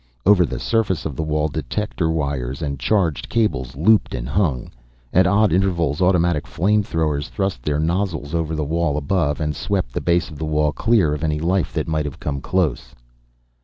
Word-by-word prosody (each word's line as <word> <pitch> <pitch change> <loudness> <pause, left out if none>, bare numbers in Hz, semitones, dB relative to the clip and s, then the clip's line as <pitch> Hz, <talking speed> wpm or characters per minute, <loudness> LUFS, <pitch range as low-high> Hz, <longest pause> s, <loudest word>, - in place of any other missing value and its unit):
Over 90 -3 +5
the - - -4
surface 105 -8 0
of 75 - -3
the - - -3
wall 75 -1 0
detector 80 +4 -2
wires 70 -3 -2
and 70 -2 -3
charged 85 - 0
cables 70 - 0
looped 105 +9 +3
and - - -4
hung. 70 -5 0 0.4
At 95 +1 +5
odd 100 0 +3
intervals 85 -5 +1
automatic 85 -4 +2
flame 105 +5 +2
throwers 75 -6 -1
thrust 95 -10 -2
their 75 +3 -1
nozzles 85 -2 -1
over 80 -1 -1
the 75 -1 -2
wall 80 -1 0
above 75 -1 0
and 75 -2 -2
swept - - -2
the - - -2
base 85 -1 +1
of 75 - -10
the - - -4
wall 75 -1 +1
clear 105 -6 +2
of 75 +1 -4
any 75 -1 0
life 90 +2 0
that - - -2
might 80 -1 -1
have 70 - -6
come 70 -2 -3
close. 70 -9 -1
80 Hz, 190 wpm, -21 LUFS, 75-95 Hz, 0.4 s, Over